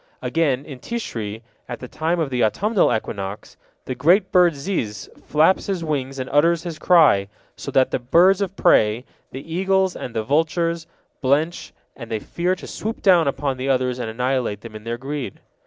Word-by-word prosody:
Again, 145 Hz, -5 st, 0 dB
in 135 Hz, -4 st, -9 dB
Tishri, 115 Hz, -, -5 dB, 0.3 s
at -, -, -5 dB
the 125 Hz, -, -8 dB
time 165 Hz, +6 st, -1 dB
of 155 Hz, -4 st, -1 dB
the 125 Hz, -1 st, +1 dB
autumnal 205 Hz, -, +2 dB
equinox, 100 Hz, -2 st, -4 dB, 0.3 s
the 130 Hz, -, -3 dB
great 185 Hz, +8 st, +3 dB
bird 175 Hz, -4 st, +4 dB
ziz 140 Hz, -, -3 dB, 0.2 s
flaps 155 Hz, +5 st, +2 dB
his 190 Hz, -4 st, -2 dB
wings 135 Hz, -4 st, -3 dB
and 130 Hz, -1 st, -4 dB
utters 165 Hz, +4 st, +3 dB
his 165 Hz, -3 st, -6 dB
cry, 150 Hz, -, +5 dB, 0.3 s
so -, -, -7 dB
that 130 Hz, -1 st, +2 dB
the -, -, 0 dB
birds 175 Hz, +10 st, +4 dB
of 195 Hz, -1 st, -2 dB
prey, 110 Hz, -, +3 dB, 0.2 s
the 140 Hz, +5 st, -8 dB
eagles 190 Hz, +1 st, +1 dB
and 120 Hz, -, -7 dB
the 110 Hz, -, 0 dB
vultures, 165 Hz, +4 st, 0 dB, 0.3 s
blench, 150 Hz, +5 st, 0 dB, 0.2 s
and 115 Hz, -3 st, -9 dB
they 110 Hz, -, -1 dB
fear 175 Hz, -, -2 dB
to -, -, -11 dB
swoop 220 Hz, +2 st, -5 dB
down 175 Hz, -6 st, +5 dB
upon 135 Hz, -1 st, -1 dB
the 130 Hz, +2 st, -3 dB
others 130 Hz, -1 st, 0 dB
and 115 Hz, -, -3 dB
annihilate 125 Hz, -3 st, -1 dB
them 115 Hz, -2 st, -10 dB
in 110 Hz, 0 st, -10 dB
their 115 Hz, +1 st, -3 dB
greed. 135 Hz, -4 st, -5 dB
140 Hz, 185 wpm, -22 LUFS, 125-170 Hz, 0.3 s, cry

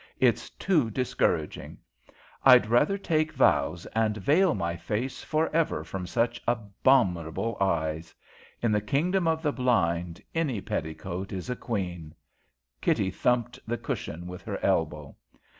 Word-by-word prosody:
It's -, -, +2 dB
too 155 Hz, -12 st, +1 dB
discouraging. 125 Hz, +3 st, -1 dB, 0.7 s
I'd 125 Hz, -3 st, +8 dB
rather 120 Hz, -, +3 dB
take 160 Hz, -4 st, 0 dB
vows 85 Hz, -, +2 dB
and 110 Hz, -1 st, +1 dB
veil 160 Hz, -, +3 dB
my 85 Hz, -3 st, -2 dB
face 105 Hz, +10 st, -3 dB
for 155 Hz, +1 st, +1 dB
ever 160 Hz, -, +1 dB
from 90 Hz, +2 st, -6 dB
such 120 Hz, +2 st, 0 dB
abominable 110 Hz, -, +1 dB
eyes. 80 Hz, -4 st, -1 dB, 0.5 s
In 115 Hz, -, +3 dB
the 105 Hz, 0 st, +2 dB
kingdom 165 Hz, -, +1 dB
of 160 Hz, 0 st, 0 dB
the 145 Hz, -2 st, +1 dB
blind 85 Hz, -9 st, 0 dB
any 150 Hz, -9 st, 0 dB
petticoat 90 Hz, +2 st, -4 dB
is 95 Hz, +5 st, -4 dB
a -, -, -1 dB
queen." 90 Hz, -10 st, -4 dB, 0.7 s
Kitty 95 Hz, -1 st, +1 dB
thumped 120 Hz, +4 st, 0 dB
the 120 Hz, +1 st, -1 dB
cushion 85 Hz, -5 st, -5 dB
with 90 Hz, 0 st, -8 dB
her -, -, -4 dB
elbow. -, -, 0 dB
110 Hz, 135 wpm, -27 LUFS, 90-135 Hz, 0.7 s, I'd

